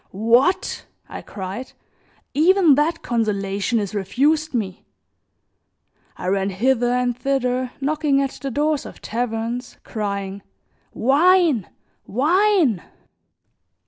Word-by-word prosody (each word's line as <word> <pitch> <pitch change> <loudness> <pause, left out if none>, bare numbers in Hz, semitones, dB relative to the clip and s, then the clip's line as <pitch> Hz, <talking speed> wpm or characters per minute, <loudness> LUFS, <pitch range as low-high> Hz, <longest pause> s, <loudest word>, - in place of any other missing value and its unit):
"What!" 275 +10 +2 0.2
I - - -8
cried, 200 +6 -7 0.6
"even 340 +1 +5
that 305 +4 +1
consolation 205 -1 -1
is 205 -3 -2
refused 285 - +1
me!" 205 -6 -3 1.3
I - - -7
ran 195 +1 +1
hither 240 +5 +1
and 250 -1 0
thither 255 -1 -1
knocking 290 0 +1
at 275 -1 0
the 275 - -3
doors 295 +3 0
of - - -12
taverns 235 +1 -3
crying: 200 -2 -4 0.5
"Wine! 305 - +3 0.4
Wine!" 315 - +2
250 Hz, 100 wpm, -21 LUFS, 210-295 Hz, 1.3 s, even